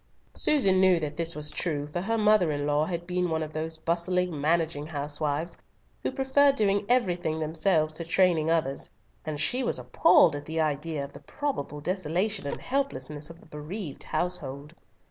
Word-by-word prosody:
Susan 195 -11 +3
knew 185 -2 +5
this 160 +2 -3
was 150 0 -2
true, 150 -5 -2
for 150 +4 -4
her 225 +4 0
mother 210 -6 +4
in 145 -1 -2
law 145 +1 +2
had 170 0 -4
been 180 0 -1
one 160 -1 0
of 155 0 -7
those 160 +1 -4
bustling, 170 0 0
managing 160 -1 0
housewives, 150 +2 -3 0.5
who - - -1
prefer 275 +1 +4
doing 205 -6 +1
everything 175 -10 +1
themselves 155 0 +2
to 170 - -2
training 165 -2 +2
others, 155 -5 0 0.4
and 155 -2 -3
she 250 - +1
was - - +1
appalled 310 - +4
at 145 - -7
the 160 +1 -2
idea 155 0 -1
of 140 0 -9
the - - -10
probable 270 - -4
desolation 185 +2 -1
and - - -4
helplessness 250 - -3
of 165 0 -12
the - - -19
bereaved 155 +2 -7
household. 150 -4 -3
165 Hz, 170 wpm, -27 LUFS, 150-185 Hz, 0.5 s, knew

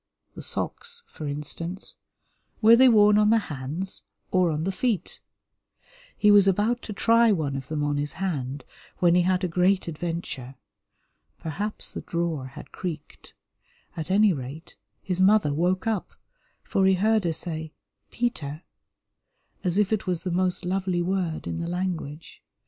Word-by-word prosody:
The - - -9
socks, 470 0 -4
for 155 - -8
instance, 165 +6 -5 0.6
were 225 +1 +8
they 260 +2 +7
worn 210 -2 +6
on 210 0 +4
the 225 - +5
hands 160 +1 -4 0.3
or 185 -2 +3
on 155 0 -1
the 190 - 0
feet? 200 -2 -2 1.0
He 210 - +5
was 200 -1 +7
about 210 +6 +2
to - - -7
try 230 +2 +4
one 155 -8 0
of 135 -1 -5
them 150 0 -2
on 145 0 0
his 145 0 -2
hand, 145 -7 -3 0.3
when 175 -1 +4
he 180 - +5
had 185 +1 +1
a - - +2
great 180 +2 +2
adventure. 155 -5 -5 0.8
Perhaps 200 +7 -4
the - - -5
drawer 170 -6 -2
had 145 +3 -11
creaked; 160 -5 -7 0.6
at 160 +1 -5
any 205 +1 +5
rate, 140 +3 -8 0.3
his 185 -1 -1
mother 190 -6 +4
woke 180 +6 0
up, 220 -4 -2 0.5
for 190 -1 +2
he 190 - +5
heard 215 +3 +2
her 170 -2 0
say 160 -1 -4 0.4
"Peter," 160 -10 -3 1.0
as 180 -1 0
if 210 0 +2
it 210 - -1
was 180 -3 -1
the 185 - -2
most 180 0 0
lovely 185 -1 0
word 180 -3 -2
in - - -3
the 170 0 -3
language. 175 -4 -4
180 Hz, 160 wpm, -26 LUFS, 155-200 Hz, 1.0 s, were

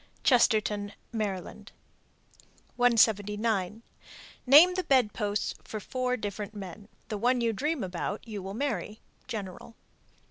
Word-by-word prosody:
Chestertown, 215 -5 +2 0.2
Md. 205 -1 -4 1.1
179. 215 -3 +2 0.6
Name 310 +8 +8
the 370 0 -1
bed 255 -8 +3
posts 205 -1 -2
for 215 - -6
four 250 +4 -2
different 205 0 -5
men. 200 +1 -8 0.2
The 210 - -3
one 245 +3 +2
you 230 -1 +1
dream 290 +3 -1
about 190 +4 -4
you 210 -3 -5
will 195 +2 -6
marry. 220 -6 -3 0.3
_General. 215 -1 -7
215 Hz, 115 wpm, -29 LUFS, 205-245 Hz, 1.1 s, Name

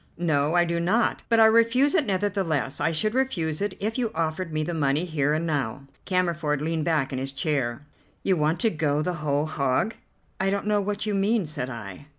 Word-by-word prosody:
"No, 155 -2 +1
I 175 0 +4
do 170 0 -1
not, 205 +8 +1
but 230 -1 +4
I 225 - +8
refuse 230 +5 +4
it 320 -9 +2
nevertheless. 185 -8 -1
I 165 - +2
should 215 +7 0
refuse 175 -13 -1
it 205 - -2
if 220 +4 -2
you 235 -3 0
offered 165 +2 -2
me 155 0 -1
the 170 +3 -3
money 150 +1 +1
here 150 -3 0
and 160 +2 -1
now." 140 -5 -2 0.2
Cammerford 170 -6 0
leaned 160 +1 -1
back 150 -5 0
in 130 - -2
his 135 +1 -2
chair. 140 -3 -2 0.4
"You 190 - +2
want 155 +1 +1
to 225 -3 +3
go 150 -2 0
the 180 - -1
whole 145 0 +1
hog?" 145 - 0 0.5
"I 190 - +1
don't 200 +1 -1
know 210 -1 +2
what 205 +1 -2
you 210 - -1
mean," 200 +1 +1
said 140 -4 -4
I. 110 0 -8
165 Hz, 210 wpm, -25 LUFS, 150-200 Hz, 0.5 s, I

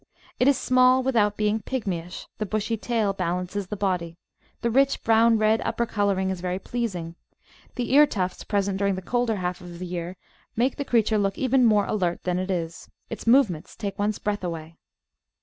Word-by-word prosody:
It 250 - +4
is 280 -2 +5
small 255 0 +4
without 215 -6 +2
being 215 +1 +1
pigmyish; 190 -7 -4
the 215 - -1
bushy 215 +2 -1
tail 220 -2 0
balances 180 +1 -3
the 210 - -5
body; 180 -4 -2 0.4
the 235 - 0
rich 275 +3 +2
brown 225 0 +4
red 215 +1 +2
upper 235 - -1
colouring 200 -3 0
is 185 -2 -5
very 180 0 -2
pleasing; 190 -6 -4 0.6
the 250 0 -2
ear 295 +2 +7
tufts 185 -6 -3
present 200 -2 -1
during 200 -1 +1
the 185 - -6
colder 240 +1 0
half 180 -2 -3
of 175 -1 -10
the 185 - -6
year 175 +1 -5 0.4
make 245 +4 +1
the 285 - -3
creature 220 -3 +2
look 195 -1 0
even 260 0 +2
more 210 -3 +4
alert 180 -5 -1
than 180 0 0
it 185 +1 -3
is; 170 -3 -4 0.2
its 225 - -7
movements 230 - +3
take 200 -2 -5
one's 205 +1 0
breath 205 -2 -3
away. 165 -2 -5
205 Hz, 185 wpm, -25 LUFS, 180-230 Hz, 0.6 s, ear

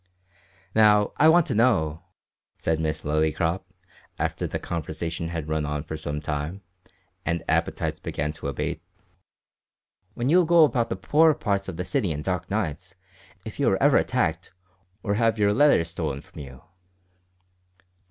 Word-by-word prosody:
"Now, 105 -1 +5
I 155 +2 +6
want 170 0 +5
to - - -2
know," 95 -10 +2 0.6
said 80 -1 -1
Miss 75 -1 -2
Lillycrop, 80 +4 0 0.6
after - - -2
the - - -3
conversation 85 0 -4
had 80 -3 -4
run 80 -1 -1
on 75 0 -3
for 80 0 -6
some 75 -1 -4
time, 75 +5 -4 0.6
and 85 +2 -2
appetites - - -1
began 75 +1 -3
to 75 - -7
abate, 75 +3 -3 1.3
"when 120 - -2
you 175 +5 +5
go 170 0 +6
about 120 -6 +2
the - - -1
poorer 150 +11 +3
parts 100 -3 -1
of 90 -4 -6
the 90 - -3
city 95 -2 0
in 75 0 -4
dark 90 -1 -3
nights, 95 -2 -3 0.5
if 110 - -8
you 140 - +3
are 95 - +1
ever 145 -1 +5
attacked, 85 -9 0 0.5
or 100 - 0
have 115 +1 +2
your 105 -1 +3
letters 135 - +4
stolen 80 -5 -3
from - - -14
you." 70 -3 -10
85 Hz, 155 wpm, -25 LUFS, 80-110 Hz, 1.3 s, I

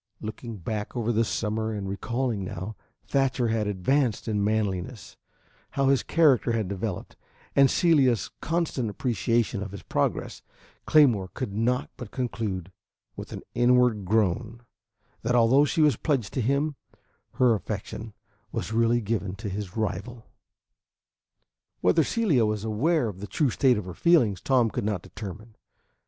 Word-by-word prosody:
Looking 110 +1 -7
back 105 +5 -4
over 120 0 0
the 115 0 +2
summer 110 0 -2
and 100 -2 -4
recalling 115 0 -2
how 95 +6 -6 0.3
Thatcher 130 -3 +1
had 110 -2 0
advanced 115 +6 0
in 105 -2 0
manliness, 105 -1 -2 0.6
how 135 -1 +3
his 135 -1 +3
character 140 -7 +3
had 110 -4 0
developed, 100 -1 -4 0.4
and 140 -1 +6
Celia's 130 - +3
constant 160 -8 -1
appreciation 115 -1 0
of 100 -2 -5
his 100 - -9
progress, - - -2 0.5
Claymore 125 -11 +5
could 125 -6 -4
not 120 +4 0
but 120 -4 -8
conclude, 105 -8 -3 0.4
with - - -8
an - - -7
inward 120 -4 +3
groan, 110 +3 0 0.6
that 120 +2 0
although 120 +5 +5
she 155 - 0
was 150 -7 +4
pledged 135 -10 -1
to 130 - 0
him, 140 +6 +1 0.6
her 125 -2 +4
affection 105 +1 -5 0.4
was 110 - -4
really 115 +1 +3
given 100 -3 -2
to 105 +1 -5
his 100 0 -5
rival. 110 +3 -3 1.6
Whether 90 - +4
Celia 170 - +2
was 105 -1 -2
aware 125 +6 +1
of 100 -4 -6
the 105 - -6
true 130 - +1
state 125 +1 +3
of 105 - -4
her 90 - -7
feelings, 120 - +3
Tom 125 -4 +2
could - - -3
not 100 -4 -2
determine. 110 +1 -9
115 Hz, 145 wpm, -26 LUFS, 105-130 Hz, 1.6 s, and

